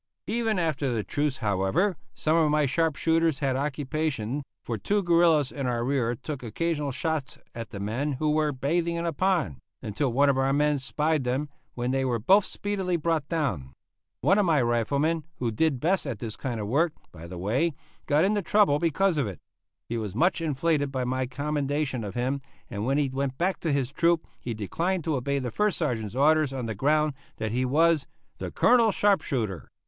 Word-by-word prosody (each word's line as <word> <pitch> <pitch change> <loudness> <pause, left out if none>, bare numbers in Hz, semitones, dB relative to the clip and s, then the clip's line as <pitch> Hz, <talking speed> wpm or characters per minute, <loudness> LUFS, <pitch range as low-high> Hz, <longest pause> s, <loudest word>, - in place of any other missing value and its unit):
Even 225 -2 0
after 155 -6 0
the 110 -3 -1
truce, 145 +1 -1
however, 105 - +1 0.2
some 155 +1 +1
of 160 -2 +4
my 150 0 +3
sharp 160 +3 +1
shooters 165 -2 +2
had 135 -2 0
occupation, 140 -2 -2 0.2
for 115 - -3
two 200 - 0
guerillas 165 -5 +4
in 140 -2 -3
our 120 -1 -1
rear 125 -3 0
took 140 +3 -6
occasional 150 +5 -2
shots 155 0 -2 0.2
at 115 0 -6
the 100 - -7
men 120 +9 -2
who 150 +3 0
were 155 0 +2
bathing 165 +6 0
in 170 0 -2
a 165 - -1
pond, 175 - +1 0.2
until 125 +6 -2
one 140 +4 +4
of 135 -1 +3
our 135 0 +2
men 150 0 +2
spied 150 +2 0
them, 130 +4 -1 0.3
when 125 +1 -1
they 135 0 +1
were 125 -3 +1
both 190 - +4
speedily 190 -3 -2
brought 160 -3 0
down. 125 - -2 0.5
One 195 +2 +4
of 205 - +3
my 160 -2 +4
riflemen 140 +8 +1
who 120 -2 -2
did 140 +3 +1
best 175 +3 +1
at 125 -5 -3
this 110 0 -5
kind 120 -4 -4
of 105 - -3
work, 155 +8 +2 0.2
by 85 0 -10
the 90 +1 -8
way, 130 - 0 0.3
got 155 +3 +4
into 205 +1 +1
trouble 200 -6 +3
because 170 +1 +2
of 135 - 0
it. 95 - -6 0.5
He 115 0 -2
was 105 -3 -5
much 170 +6 +2
inflated 150 -1 0
by 130 -2 -1
my 130 +1 -1
commendation 145 -1 -2
of 100 +1 -6
him, 130 +3 -1 0.3
and 105 +3 -3
when 135 +2 +2
he 145 -2 +1
went 135 0 -2
back 185 +2 0
to 165 - -1
his 140 -2 0
troop 170 +2 +2
he 120 -2 -4
declined 170 - -1
to 160 -1 0
obey 140 +2 -1
the 125 -3 -3
first 210 - +1
Sergeant's 110 -2 -2
orders 155 +1 +4
on 130 -3 -4
the 110 - -3
ground 150 +7 +2 0.2
that 110 -1 -2
he 125 +2 0
was 155 +2 +3 0.3
"the - - -4
Colonel's 230 -4 +4
sharp 205 -2 +3
shooter." 110 - -3
145 Hz, 200 wpm, -27 LUFS, 125-165 Hz, 0.5 s, of